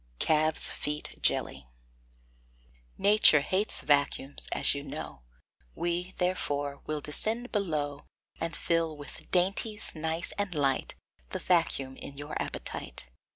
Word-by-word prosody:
CALVES' 155 Hz, -, +3 dB
FEET 150 Hz, 0 st, -4 dB
JELLY. 65 Hz, -2 st, 0 dB, 1.3 s
Nature 205 Hz, -7 st, +6 dB
hates 190 Hz, +8 st, 0 dB
vacuums, 140 Hz, -1 st, +2 dB
as -, -, +3 dB
you 140 Hz, -, -3 dB
know, 140 Hz, -, -7 dB, 0.5 s
We, 175 Hz, +2 st, -1 dB
therefore, 145 Hz, -6 st, -1 dB
will 155 Hz, -1 st, -1 dB
descend 225 Hz, -, +1 dB
below, 150 Hz, -8 st, -1 dB, 0.3 s
And 165 Hz, 0 st, -2 dB
fill, 165 Hz, -2 st, 0 dB
with 145 Hz, -1 st, -9 dB
dainties 195 Hz, +4 st, +1 dB
nice 160 Hz, +2 st, -2 dB
and 200 Hz, -4 st, -1 dB
light, 140 Hz, -3 st, +1 dB, 0.3 s
The -, -, -2 dB
vacuum 140 Hz, -7 st, +1 dB
in 140 Hz, -, -8 dB
your 145 Hz, +1 st, -6 dB
appetite. -, -, -5 dB
155 Hz, 115 wpm, -30 LUFS, 145-180 Hz, 1.3 s, Nature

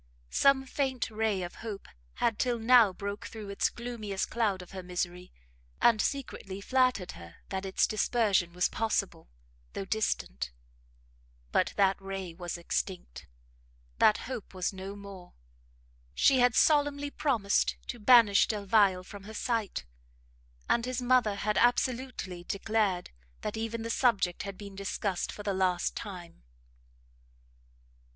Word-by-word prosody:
Some 275 Hz, -1 st, +4 dB
faint 260 Hz, -3 st, -2 dB
ray 215 Hz, -3 st, 0 dB
of 175 Hz, -, -7 dB
hope 215 Hz, -3 st, -6 dB, 0.3 s
had 220 Hz, -, 0 dB
till 245 Hz, -2 st, +1 dB
now 230 Hz, -2 st, +6 dB
broke 200 Hz, +2 st, -5 dB
through 220 Hz, -2 st, -8 dB
the 200 Hz, -, 0 dB
gloomiest 225 Hz, -5 st, -4 dB
cloud 205 Hz, -6 st, 0 dB
of 180 Hz, -, -16 dB
her 190 Hz, -, -6 dB
misery, 180 Hz, 0 st, -4 dB, 0.5 s
and 220 Hz, -3 st, +5 dB
secretly 200 Hz, -8 st, -3 dB
flattered 255 Hz, -4 st, +1 dB
her 85 Hz, 0 st, -12 dB
that 190 Hz, 0 st, -3 dB
its 190 Hz, -, +2 dB
dispersion 210 Hz, -5 st, +1 dB
was 180 Hz, +1 st, +1 dB
possible, 220 Hz, -, -2 dB, 0.4 s
though 195 Hz, -, -4 dB
distant: 65 Hz, -, -2 dB, 1.0 s
but -, -, +2 dB
that 195 Hz, -1 st, +2 dB
ray 195 Hz, -2 st, -5 dB
was 175 Hz, 0 st, -5 dB
extinct, 175 Hz, -, -4 dB, 0.7 s
that 215 Hz, -, +6 dB
hope 240 Hz, -6 st, -7 dB
was 185 Hz, +1 st, -1 dB
no 190 Hz, +1 st, -7 dB
more; 200 Hz, -3 st, -11 dB, 0.8 s
she 265 Hz, -2 st, +5 dB
had 245 Hz, -1 st, +4 dB
solemnly 290 Hz, -1 st, +3 dB
promised 240 Hz, -11 st, +1 dB
to 240 Hz, -, -6 dB
banish 225 Hz, -3 st, +6 dB
Delvile 200 Hz, -3 st, +2 dB
her 200 Hz, +2 st, -10 dB
sight, 225 Hz, -, -2 dB, 0.8 s
and 235 Hz, +1 st, +1 dB
his 255 Hz, 0 st, -2 dB
mother 245 Hz, -4 st, +3 dB
had 210 Hz, 0 st, 0 dB
absolutely 245 Hz, -7 st, 0 dB
declared 200 Hz, -1 st, -1 dB, 0.3 s
that 210 Hz, -, -3 dB
even 225 Hz, +1 st, -3 dB
the 230 Hz, -, -2 dB
subject 200 Hz, -9 st, +2 dB
had 200 Hz, -2 st, -6 dB
been 200 Hz, -1 st, -9 dB
discussed 195 Hz, -1 st, -2 dB
for 205 Hz, -, -8 dB
the 200 Hz, -1 st, -1 dB
last 185 Hz, -2 st, +1 dB
time. 180 Hz, -, -8 dB
205 Hz, 135 wpm, -30 LUFS, 190-235 Hz, 1.0 s, now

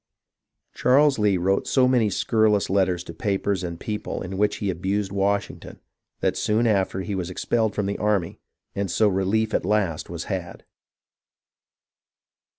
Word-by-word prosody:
Charles 135 Hz, +1 st, +3 dB
Lee 105 Hz, -3 st, +3 dB
wrote 95 Hz, +3 st, 0 dB
so 130 Hz, -2 st, +3 dB
many 120 Hz, -4 st, +3 dB
scurrilous 105 Hz, -1 st, +1 dB
letters 95 Hz, -3 st, +1 dB
to 85 Hz, -, -9 dB
papers 100 Hz, +2 st, -1 dB
and 85 Hz, -1 st, -5 dB
people, 105 Hz, -1 st, -4 dB
in 95 Hz, +1 st, -6 dB
which 105 Hz, +2 st, +1 dB
he 100 Hz, -2 st, -2 dB
abused 95 Hz, +2 st, -2 dB
Washington, 100 Hz, +1 st, -2 dB, 0.4 s
that -, -, +1 dB
soon 115 Hz, +1 st, +1 dB
after 95 Hz, -3 st, +1 dB
he 100 Hz, +2 st, -4 dB
was 90 Hz, -2 st, -3 dB
expelled 110 Hz, +3 st, -1 dB
from 105 Hz, -, -1 dB
the 100 Hz, +1 st, -3 dB
army, 105 Hz, -5 st, 0 dB, 0.3 s
and 100 Hz, -1 st, -2 dB
so 105 Hz, +5 st, +3 dB
relief 100 Hz, +3 st, 0 dB
at -, -, +1 dB
last 95 Hz, -4 st, 0 dB
was -, -, -5 dB
had. -, -, -5 dB
100 Hz, 155 wpm, -24 LUFS, 95-105 Hz, 0.4 s, Charles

